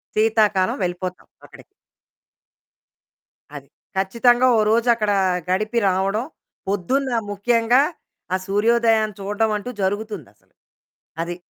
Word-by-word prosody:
సీతాకాలం 215 -3 +2
వెళ్ళిపోతావు 180 +1 -4 0.2
అక్కడికి. - - -16 1.9
అది. - - -11 0.3
ఖచ్చితంగా 240 +6 +3
ఓ - - +3
రోజక్కడా 225 -2 +2 0.3
గడిపి 215 +5 0
రావడం, 195 +5 0 0.4
పొద్దున్న 250 +8 -1 0.2
ముఖ్యంగా 230 +5 +2 0.5
ఆ - - +3
సూర్యోదయాన్ని 220 0 +2
చూడడమంటూ 210 +3 -1
జరుగుతుందసలు. 195 - -5 0.7
అది. 175 +1 -4
215 Hz, 85 wpm, -21 LUFS, 195-230 Hz, 1.9 s, ఖచ్చితంగా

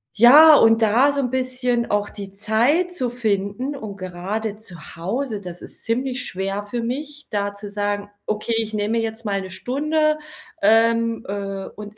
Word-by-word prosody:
Ja, 295 +8 +9
und 225 -1 +5
da 240 +7 +4
so 280 0 -1
'n 250 -2 -2
bisschen 250 -2 -1
auch 205 0 +1
die 200 -2 -8
Zeit 240 - +1
zu 255 -9 -1
finden 225 +3 -2
und 215 -7 -7
gerade 200 +4 -4
zu 210 -4 -8 0.2
Hause, 215 +6 -3
das 175 -2 -8
ist - - -6
ziemlich 250 +2 -1
schwer 195 +2 -3
für 230 +3 -4
mich, 290 +5 -5
da 205 -1 -2
zu 205 0 -8
sagen: 205 0 -2 0.2
„Okay, 215 +2 -1
ich 220 -1 -3
nehme 215 +2 0
jetzt 225 0 -4
mal 200 -2 -1
'ne 190 - -8
Stunde, 305 +9 0 0.4
ähm, 230 +2 +3
äh, 195 -1 -4
und 210 0 -10
220 Hz, 170 wpm, -22 LUFS, 205-250 Hz, 0.4 s, Ja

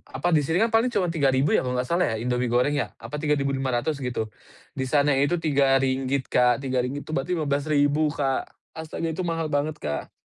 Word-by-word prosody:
apa, 140 +7 -1
di 150 - +4
sini 160 +5 0
kan 225 - +4
paling 240 +2 +3
cuman 195 -5 +1
Rp3.000 135 -1 +2
ya - - +2
kalau 125 0 -2
enggak 125 - -2
salah 175 +2 +2
ya - - -1
Indomie 125 -1 -1
goreng 125 +4 +2
ya, - - -1
apa 115 +5 -7
Rp3.500 140 -2 0
gitu. 120 -3 -2 0.5
Di - - +1
sana 145 -1 +3
itu 145 +6 +2
RM3, 135 -1 +2
Kak, 125 +1 +3
RM3, 130 +2 -1
itu - - -6
berarti 135 +7 -2
Rp15.000, 145 0 +1
Kak. 135 -2 -2 0.2
Astaga 160 +1 -4
itu 185 - -3
mahal 165 -1 -2
banget, 150 +2 0
Kak. 75 -1 -4
140 Hz, 195 wpm, -25 LUFS, 130-155 Hz, 0.5 s, di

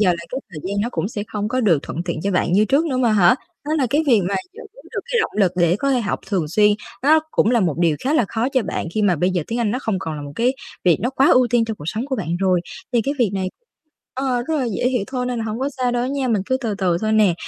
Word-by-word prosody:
giờ 195 -4 +4
là 170 -1 -2
cái 260 - -2
thời 155 - -8
gian 200 +1 -1
nó 225 - 0
cũng 195 - -2
sẽ 210 -2 -4
không 210 0 -2
có 255 +3 0
được 190 - +4
thuận 170 - -4
tiện 170 -3 -3
cho 200 - 0
bạn 180 -2 +1
như 205 +3 +5
trước 275 +9 +2
nữa 265 - -1
mà 240 -3 +3
hả? 190 -3 +5 0.3
Đó 300 - -2
là 265 - +2
cái 295 +3 +3
việc 235 -7 +5
mà 200 - -1 0.2
giữ 455 - -12 0.3
được - - -2
cái 475 - +3
động - - -1
lực 190 -4 +3
để 175 0 +3
có 275 +6 0
thể 255 -2 +2
học 205 - -2
thường 180 -7 -1
xuyên 210 +6 +4 0.3
nó 310 +3 +5
cũng 220 - +2
là 240 -2 +3
một 170 -7 +1
điều 165 -3 +2
khá 280 +4 +1
là 250 - +3
khó 230 +5 -1
cho 260 -2 +1
bạn 190 - -3
khi 215 - +1
mà 190 -4 +3
bây 180 +5 +1
giờ 180 -3 0
tiếng 230 - -3
Anh 225 -3 +1
nó 245 - -1
không 220 -7 -2
còn 160 -4 -4
là 145 - -6
một 145 0 -8
cái 245 +2 +2 0.3
việc 175 -4 +5
nó 245 - 0
quá 270 +1 +3
ưu 255 -1 +5
tiên 240 -1 +3
trong 220 -1 -4
cuộc 145 - -10
sống 225 +8 -2
của 270 -2 -2
bạn 175 -5 -2
rồi. 185 -2 +3 0.3
Thì 235 -2 +3
cái 280 +4 -1
việc 235 -6 +2
này 190 -1 -1 0.7
ờ, 255 -2 -1
rất 320 - 0
là 260 - 0
dễ - - +1
hiểu 250 -5 0
thôi 250 -2 -3
nên 250 -1 -2
là 225 - -3
hông 220 +1 -3
có 270 +2 -1
sao 250 -1 +1
đâu 245 0 0
nha. 270 -1 -1
Mình 220 -5 +1
cứ 260 0 +1
từ 235 -5 -3
từ 180 -4 +1
thôi 215 0 0
nè. 215 -4 +4
220 Hz, 315 wpm, -21 LUFS, 185-255 Hz, 0.7 s, như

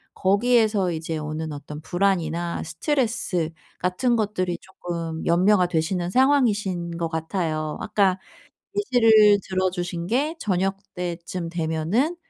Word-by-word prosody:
거기에서 210 -1 +2
이제 160 0 -3
오는 155 +1 -4
어떤 150 +1 -8
불안이나 175 -2 0
스트레스 220 - -1 0.3
같은 210 +7 +1
것들이 190 -5 -1
쪼끔 170 -3 -5
염려가 180 +2 +4
되시는 175 +1 -1
상황이신 210 -10 +2
것 170 -1 -1
같아요. 160 -2 -2
아까 195 -3 +2 0.6
예시를 225 - +5
들어주신 180 -2 -1
게 290 - 0
저녁때쯤 180 - -3
되면은 170 - 0
180 Hz, 275 characters per minute, -24 LUFS, 170-210 Hz, 0.6 s, 예시를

